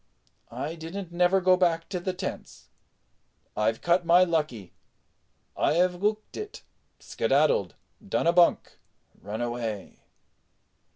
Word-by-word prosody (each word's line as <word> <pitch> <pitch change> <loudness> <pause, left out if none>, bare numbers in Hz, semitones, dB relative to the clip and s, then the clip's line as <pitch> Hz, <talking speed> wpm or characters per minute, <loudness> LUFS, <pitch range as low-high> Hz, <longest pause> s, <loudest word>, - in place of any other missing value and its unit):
"I 155 +3 -5
didn't 170 +3 -7
never 180 +2 +3
go 185 0 +4
back 170 -2 +1
to 185 -3 -3
the 185 +2 -2
tents. 185 +1 -7 0.9
I've 110 +1 0
cut 175 +1 +2
my 175 +2 +5
lucky, 150 - -2 0.8
I 160 - +1
'ave 180 0 +2
'ooked 215 +1 -1
it, 425 0 -8 0.4
skedaddled, 485 -1 +1 0.3
done - - 0
a 170 - +4
bunk, 175 -1 +2 0.4
run 105 +4 -5
away." 120 -4 -4
175 Hz, 120 wpm, -27 LUFS, 145-185 Hz, 0.9 s, my